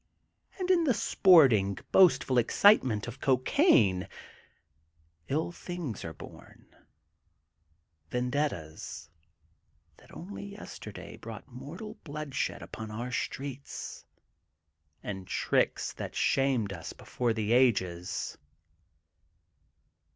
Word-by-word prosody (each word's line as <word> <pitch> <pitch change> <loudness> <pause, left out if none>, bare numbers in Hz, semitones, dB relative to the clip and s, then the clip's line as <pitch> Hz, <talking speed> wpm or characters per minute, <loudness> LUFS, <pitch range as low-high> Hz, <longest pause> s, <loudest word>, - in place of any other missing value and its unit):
And 370 -1 0
in 345 -2 +4
the 265 -6 +2
sporting, 125 - +5
boastful 135 -8 +5
excitement 120 - +4
of 120 +2 -8
cocaine, 125 - +3 1.2
ill 155 +5 -1
things 175 - -6
are 80 - -5
bom, - - -13 1.4
vendettas 85 - -3 0.9
that - - -19
only 195 +5 -8
yesterday 105 - -9
brought 115 +2 -9
mortal 145 - -9
bloodshed 150 -2 -3
upon 110 -1 -7
our 120 +4 -5
streets 135 +2 -5 1.0
and 95 -2 -6
tricks - - 0
that - - -7
shamed 130 -7 +1
us 85 -3 -7
before 120 -2 -2
the 110 -1 -2
ages. 95 -8 +1
125 Hz, 90 wpm, -30 LUFS, 105-155 Hz, 1.4 s, sporting